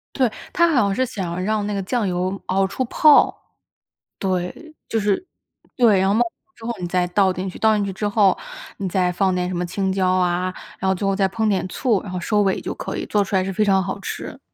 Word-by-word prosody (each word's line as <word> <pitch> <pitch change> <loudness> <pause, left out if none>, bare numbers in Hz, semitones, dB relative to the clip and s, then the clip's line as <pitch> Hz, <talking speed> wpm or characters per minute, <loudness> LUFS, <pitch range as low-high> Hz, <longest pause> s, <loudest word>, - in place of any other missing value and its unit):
对， 255 -5 +2 0.2
它 340 0 +4
好 280 -8 +3
像 200 -1 +1
是 260 - +1
想 185 -6 -4
让 210 0 0
那 210 - -2
个 200 - -1
酱 220 +2 -1
油 185 +2 -2
熬 190 +1 +1
出 260 +6 -2
泡。 300 +4 +5 0.8
对， 190 - -3
就 225 - -1
是 205 - 0 0.5
对， 225 -7 +4
然 190 - +2
后 195 - +3
冒 225 - +3
泡 235 - +1 0.3
之 230 - -16
后 240 - -1
你 175 - -3
再 180 0 +1
倒 190 +1 +3
进 185 +1 -4
去， - - -10
倒 220 -1 +4
进 205 - 0
去 195 - -3
之 210 +2 -2
后， 205 -3 +3 0.4
你 195 - -3
再 180 0 +1
放 185 0 +1
点 180 0 -1
什 - - -4
么 175 0 -1
青 190 +2 -1
椒 190 -1 +1
啊， 180 0 +1 0.3
然 190 - 0
后 190 - +2
最 195 - -3
后 195 - +2
再 195 0 +2
烹 220 +2 -1
点 190 -2 0
醋、 220 +1 0
然 190 - -7
后 180 - -3
收 210 +4 +1
尾 190 -1 +1
就 - - -4
可 - - -5
以， - - -3
做 210 - +2
出 195 - -3
来 185 - +3
是 195 - -3
非 210 +3 +1
常 190 -1 +3
好 190 +2 -4
吃。 - - -6
195 Hz, 270 characters per minute, -21 LUFS, 185-215 Hz, 0.8 s, 泡